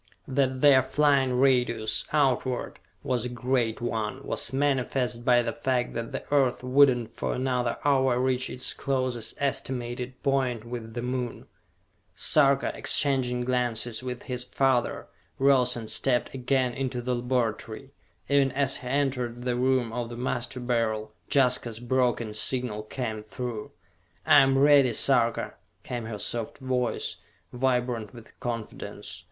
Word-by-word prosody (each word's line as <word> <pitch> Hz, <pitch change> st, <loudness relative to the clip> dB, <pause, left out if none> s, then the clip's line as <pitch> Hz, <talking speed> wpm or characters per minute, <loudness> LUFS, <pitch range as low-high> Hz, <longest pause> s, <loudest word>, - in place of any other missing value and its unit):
That 130 Hz, -1 st, 0 dB
their 140 Hz, -3 st, +7 dB
flying 135 Hz, -1 st, +2 dB
radius, 125 Hz, -4 st, +2 dB
outward, 130 Hz, -4 st, 0 dB, 0.2 s
was 125 Hz, -3 st, -1 dB
a 125 Hz, -, -3 dB
great 120 Hz, -2 st, -1 dB
one, 120 Hz, +2 st, -3 dB
was -, -, -1 dB
manifest 130 Hz, -3 st, 0 dB
by 120 Hz, -1 st, +4 dB
the -, -, -2 dB
fact 130 Hz, -4 st, -1 dB
that 115 Hz, 0 st, -4 dB
the -, -, -4 dB
Earth 130 Hz, -3 st, +2 dB
would 135 Hz, +2 st, +6 dB
not 115 Hz, -2 st, -7 dB
for -, -, -3 dB
another 125 Hz, -2 st, -1 dB
hour 130 Hz, -3 st, +3 dB
reach 130 Hz, 0 st, +1 dB
its 125 Hz, -, -2 dB
closest 130 Hz, -4 st, -2 dB
estimated 125 Hz, -2 st, -3 dB
point 130 Hz, -5 st, 0 dB
with 115 Hz, -1 st, -7 dB
the 120 Hz, -, -3 dB
Moon. 125 Hz, -1 st, -3 dB, 0.7 s
Sarka, 140 Hz, -2 st, +3 dB
exchanging 130 Hz, -4 st, +1 dB
glances 120 Hz, -2 st, -1 dB
with 125 Hz, -1 st, -6 dB
his 125 Hz, -1 st, -4 dB
father, 130 Hz, -2 st, 0 dB, 0.3 s
rose 135 Hz, -2 st, +4 dB
and 115 Hz, -2 st, -6 dB
stepped 125 Hz, +2 st, +1 dB
again 130 Hz, -1 st, 0 dB
into 130 Hz, -1 st, -3 dB
the 125 Hz, +1 st, -2 dB
laboratory. 120 Hz, 0 st, -2 dB, 0.4 s
Even 140 Hz, -1 st, +3 dB
as 135 Hz, 0 st, +1 dB
he 125 Hz, -, -9 dB
entered 125 Hz, -3 st, -1 dB
the 125 Hz, -1 st, 0 dB
room 125 Hz, -2 st, +1 dB
of 120 Hz, -1 st, -3 dB
the 120 Hz, -, -7 dB
Master 125 Hz, +1 st, -3 dB
Beryl, 115 Hz, -3 st, -1 dB, 0.2 s
Jaska's 125 Hz, -5 st, +2 dB
broken 120 Hz, -3 st, 0 dB
signal 110 Hz, 0 st, -1 dB
came 110 Hz, -1 st, -4 dB
through. 110 Hz, +1 st, -6 dB, 0.6 s
"I 145 Hz, -, +7 dB
am 135 Hz, 0 st, +3 dB
ready, 140 Hz, -3 st, +5 dB
Sarka!" 120 Hz, -1 st, +2 dB, 0.3 s
came 120 Hz, -3 st, -5 dB
her 110 Hz, -1 st, -5 dB
soft 115 Hz, +2 st, -3 dB
voice, 130 Hz, -2 st, -2 dB, 0.4 s
vibrant 125 Hz, -3 st, -1 dB
with 115 Hz, -2 st, -15 dB
confidence. 115 Hz, -4 st, -6 dB
125 Hz, 140 wpm, -27 LUFS, 120-130 Hz, 0.7 s, their